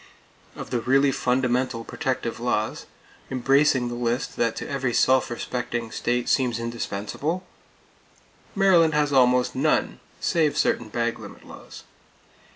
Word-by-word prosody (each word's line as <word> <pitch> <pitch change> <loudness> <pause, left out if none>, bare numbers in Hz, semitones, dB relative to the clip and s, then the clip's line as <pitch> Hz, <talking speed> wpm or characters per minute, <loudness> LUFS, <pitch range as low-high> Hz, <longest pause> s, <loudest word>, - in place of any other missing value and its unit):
Of - - -8
the 125 - 0
really 135 +3 +3
fundamental 125 -1 0
protective 120 -2 -3
laws, 115 -3 -2 0.4
embracing 135 0 +2
the 120 - -4
list 120 +1 -2
that 115 -1 0
to - - -5
every 135 -3 -2
self 130 0 +3
respecting 120 -1 -4
state 120 +1 -1
seems 125 -4 +1
indispensable, 115 - -4 1.1
Maryland 175 -6 +4
has 150 -1 +1
almost 125 -1 +3
none - - 0 0.2
save 155 -3 +1
certain 115 -3 +1
bag 115 +1 -2
limit - - -12
laws! - - -12
125 Hz, 125 wpm, -24 LUFS, 120-135 Hz, 1.1 s, Maryland